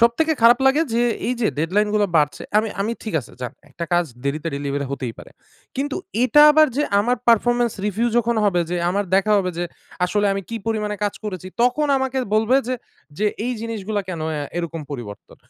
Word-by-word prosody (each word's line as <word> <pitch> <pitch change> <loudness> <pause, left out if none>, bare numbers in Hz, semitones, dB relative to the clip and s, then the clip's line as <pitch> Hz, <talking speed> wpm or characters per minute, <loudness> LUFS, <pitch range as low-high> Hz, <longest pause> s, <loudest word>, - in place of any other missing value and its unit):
সবথেকে 235 +8 +3
খারাপ 240 +2 +7
লাগে 285 +4 +4
যে 235 - +3 0.2
এই 250 - 0
যে 215 - +2
ডেডলাইনগুলো 205 +5 +1
বাড়ছে। 150 -1 +1 0.2
আমি 220 0 0
আমি 220 +3 0
ঠিক 215 -6 -5
আছে - - -15
যান, 125 - -4 0.2
একটা 170 - -5
কাজ 175 0 +3 0.2
দেরিতে 155 +4 -2
ডেলিভারি 140 0 -2
হতেই 130 -4 -4
পারে। - - -12 0.5
কিন্তু 280 +1 -2 0.3
এটা 295 +5 +6
আবার 310 +1 +6
যে 295 - +2 0.2
আমার 245 +4 +1
performance 240 0 +3
review 225 +4 0
যখন 235 0 +1
হবে 180 -4 +2
যে, 180 - 0
আমার 200 +2 0
দেখা 195 +2 +3
হবে 185 -2 -1
যে 175 - 0 0.4
আসলে 205 +3 +1
আমি 195 0 -3
কি 230 - -4
পরিমাণে 210 -2 -1
কাজ 205 - -1
করেছি। 185 -3 -5 0.2
তখন 250 +5 +2
আমাকে 265 0 -1 0.2
বলবে 225 +4 +3
যে, 255 - 0 0.4
যে 210 - +2 0.2
এই 250 - -1
জিনিসগুলা 220 -2 -3
কেনো 165 -4 -4
অ্যা 150 -2 -3
এরকম 165 -1 -4
পরিবর্তন? 115 -7 -8
210 Hz, 195 wpm, -21 LUFS, 175-240 Hz, 0.5 s, খারাপ